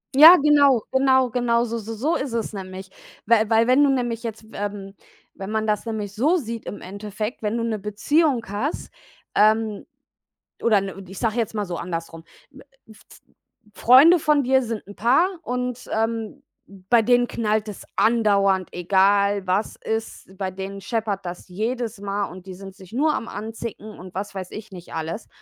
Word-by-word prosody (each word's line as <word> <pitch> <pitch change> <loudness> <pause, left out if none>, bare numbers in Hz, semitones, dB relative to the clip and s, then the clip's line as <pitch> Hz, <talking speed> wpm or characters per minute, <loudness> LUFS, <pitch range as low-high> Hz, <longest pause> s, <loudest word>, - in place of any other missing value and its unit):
Ja, 315 +6 +11
genau, 285 -5 +4
genau, 260 -2 +3
genau 235 -1 +1
s 230 - -8
s 230 -3 -4
so 225 +9 -1
ist 265 -3 -3
es 230 -1 -2
nämlich. 190 -1 -8 0.3
Weil 220 -1 +3
weil 225 0 +4
wenn 255 +4 +4
du 285 - +4
nämlich 240 -4 -1
jetzt, 220 -1 -6
ähm 200 -1 -5 0.4
wenn 195 0 -7
man 220 0 -1
das 210 +1 -1
nämlich 210 -3 -4
so 295 - +2
sieht 230 -5 -6
im 205 - -6
Endeffekt, 210 +4 -6
wenn 215 +1 -1
du 230 - -2
'ne 220 -2 -2
Beziehung 235 - +1
hast, 210 +10 -4 0.4
ähm 215 0 +2 0.8
oder 225 -3 +4
n 195 -1 -4
ich 190 +1 -9
sage 225 -2 0
jetzt 225 -2 -1
mal 210 -2 -2
so 175 -2 -5
andersrum, 165 -1 -6 0.3
w 270 - -15 0.3
f 220 - -16
f - - -16 0.5
Freunde 285 +9 +7
von 300 -1 +3
dir 265 +1 +3
sind 225 -4 -5
'n 205 - -11
Paar 255 - +3 0.2
und, 250 0 -4
ähm, 225 +4 -2 0.5
bei 235 -1 +6
denen 245 +2 +3
knallt 215 -2 -1
es 205 - -9
andauernd, 200 -5 +2
egal 200 +2 +2
was 190 +4 0
ist, 220 -4 -5
bei 190 -2 -3
denen 195 +1 -7
scheppert 210 -3 -3
das 175 0 -7
jedes 225 +2 -3
Mal 200 0 -2
und 185 0 -11
die 190 - -8
sind 195 0 -10
sich 190 +1 -15
nur 300 +4 +2
am 230 - -4
anzicken 220 0 -7
und 185 0 -11
was 200 +2 -5
weiß 185 -1 -6
ich 215 0 -9
nicht 180 -2 -11
alles. 165 +7 -5
220 Hz, 180 wpm, -23 LUFS, 195-240 Hz, 0.8 s, Ja